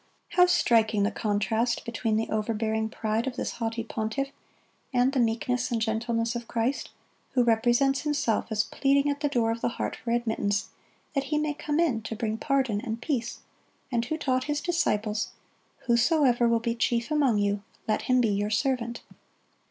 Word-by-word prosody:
How 360 0 +5
striking 225 - +3
the 205 - +1
contrast 220 +2 0
between 230 -1 -1
the 220 +1 0
overbearing 220 0 -1
pride 220 +2 -1
of 255 - -3
this - - -2
haughty 230 0 -3
pontiff 225 +5 -2 0.6
and 250 0 +3
the 270 - +1
meekness 250 +2 0
and 235 - 0
gentleness 230 +1 -1
of 235 -1 -5
Christ, 235 +4 -1 0.4
who 250 -2 +4
represents 240 +4 +3
Himself 285 -7 0
as 215 -2 +1
pleading 280 +3 +2
at 285 - -4
the 290 -1 0
door 235 -4 +1
of 230 0 -4
the - - +1
heart - - -2
for 235 - -7
admittance, 220 -3 0 0.4
that 275 -2 0
He 300 +2 0
may 300 0 0
come 295 +1 -2
in 275 -10 +2
to 225 +1 -5
bring 220 -1 -2
pardon 265 -7 +1
and 230 -2 -4
peace, 245 -3 -2 0.5
and 235 -2 +1
who 315 +6 -2
taught 255 -4 0
His 295 0 -1
disciples, 220 - 0 0.5
"Whosoever 240 0 +3
will 230 0 +3
be 230 0 -1
chief 235 +2 0
among 280 -7 +3
you, 205 0 +1 0.3
let 215 - +1
him 255 0 +3
be 230 - +2
your 205 +1 0
servant." 240 0 -1
235 Hz, 175 wpm, -27 LUFS, 220-270 Hz, 0.6 s, How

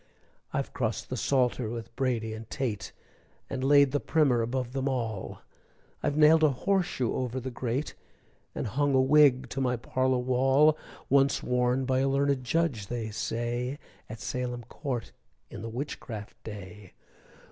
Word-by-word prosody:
I've - - -2
crossed - - -2
the - - -1
Psalter 125 -4 +1
with 115 0 -7
Brady 115 -4 -1
and 110 0 -9
Tate, 125 -7 -3 0.6
And 130 -1 -3
laid 140 0 +6
the 145 - +1
Primer 140 -8 +2
above 125 +1 -2
them 135 0 0
all, 115 -7 -3 0.6
I've 145 - 0
nailed 155 +1 +6
a 155 - +6
horseshoe 175 - 0
over 130 0 -2
the 130 +1 -5
grate, 125 +4 -2 0.6
And - - -2
hung 140 +5 +1
a - - +5
wig 135 -2 +5
to 135 - -3
my 125 -1 +1
parlor 130 +2 0
wall 135 +4 +4 0.3
Once 140 0 +3
worn 125 +1 +1
by 130 0 +1
a 135 +1 +2
learned 140 -1 +1
Judge, 130 -7 0
they 115 -3 -4
say, 120 +4 -2 0.3
At 110 +1 -7
Salem 125 +1 -3
court 125 0 -5 0.4
in - - -7
the 115 - -5
witchcraft 115 -4 -6
day! 100 -2 -9
130 Hz, 155 wpm, -28 LUFS, 115-140 Hz, 0.6 s, laid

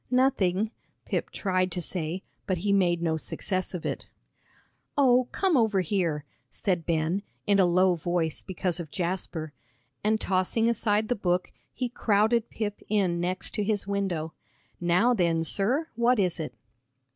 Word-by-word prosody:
"Nothing," 225 -6 +2 0.3
Pip - - -2
tried 185 -2 0
to 180 - -2
say, 175 +1 -3 0.2
but 185 -3 +1
he 200 +4 +1
made 175 -3 +2
no 160 -1 +1
success 185 +4 -3
of 175 - -5
it. - - -3 0.9
"Oh, 255 -3 +5
come 380 -4 +2
over 220 -6 +3
here," 170 -5 -1 0.2
said 180 -5 -1
Ben, 165 +3 +1 0.2
in 200 -1 +3
a 185 - +6
low 180 +1 +4
voice, 170 -1 -1
because 180 -2 -2
of 165 -3 -6
Jasper. 170 -3 -3 0.5
And 215 +1 +2
tossing 190 +5 +1
aside 215 -2 +2
the 245 - +2
book, 180 -3 0 0.2
he 250 - -2
crowded 220 0 +2
Pip 210 -2 -4
in 190 -5 +2
next 180 +2 -1
to 210 - 0
his 205 -1 0
window. 190 -6 -2 0.5
"Now 180 +8 +3
then, 170 -6 +2
sir, 245 - 0
what 235 +2 +3
is 180 -4 +1
it?" 150 -6 -5
190 Hz, 155 wpm, -27 LUFS, 175-215 Hz, 0.9 s, a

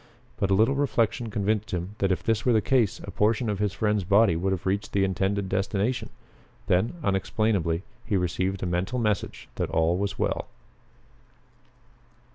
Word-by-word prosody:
But 100 - 0
a 95 - +4
little 110 +7 +4
reflection 120 -4 0
convinced 105 +1 -1
him 90 +3 -4
that 95 -1 +2
if 95 - -1
this 110 -1 +1
were 125 - +3
the 110 - +5
case 120 -3 +1
a 100 - -7
portion 110 +3 +1
of 100 - -3
his 105 -1 +1
friend's 105 0 0
body 100 0 +4
would 95 +4 0
have 95 -3 -3
reached 100 +2 -1
the 100 - +3
intended 95 +1 0
destination. 100 +5 -1 0.6
Then, 95 - +1
unexplainably, 95 -3 0 0.2
he 105 -4 0
received 95 +2 -1
a - - 0
mental 90 +7 -1
message 105 -4 -1
that - - -1
all 80 +2 +1
was 100 0 -2
well. - - -1
100 Hz, 170 wpm, -26 LUFS, 95-110 Hz, 0.6 s, the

